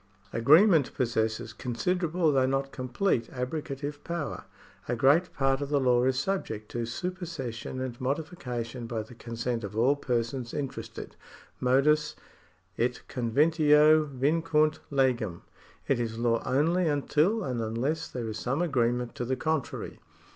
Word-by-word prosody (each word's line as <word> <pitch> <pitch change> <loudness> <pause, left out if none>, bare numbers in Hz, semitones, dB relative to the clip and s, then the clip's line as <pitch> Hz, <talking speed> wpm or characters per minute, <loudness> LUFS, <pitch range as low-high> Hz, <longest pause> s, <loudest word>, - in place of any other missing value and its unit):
Agreement 155 - +5
possesses 110 -2 -1
considerable, 165 +8 0
though 130 -2 +3
not 135 +1 -1
complete, 130 0 -1
abrogative 140 +2 -4
power. 170 -4 -4 0.4
A 120 - 0
great 145 +9 +4
part 135 0 +1
of 140 - -3
the 145 -1 +2
law 125 -2 +3
is 130 -1 +1
subject 130 - -2
to 120 -1 -3
supersession 145 -6 -5
and 130 -2 -5
modification 125 -5 -3
by 115 -2 -3
the 110 - -14
consent 115 0 -4
of 105 +1 -6
all 130 +5 +4
persons 120 -1 -2
interested. 140 -3 -6 0.4
Modus 150 +4 +3 0.6
et 125 +1 0
conventio 150 +4 +4
vincunt 155 +3 +1
legem. 125 - 0 0.4
It 135 - +2
is 115 -1 -3
law 115 -1 +1
only 165 +6 +2
until 155 +8 +1
and 125 -6 -2
unless 130 +9 -1
there 120 -3 -5
is 110 0 -4
some 135 +7 0
agreement 125 -5 0
to - - -4
the 130 +2 0
contrary. 150 -2 -3
130 Hz, 135 wpm, -28 LUFS, 120-155 Hz, 0.6 s, Agreement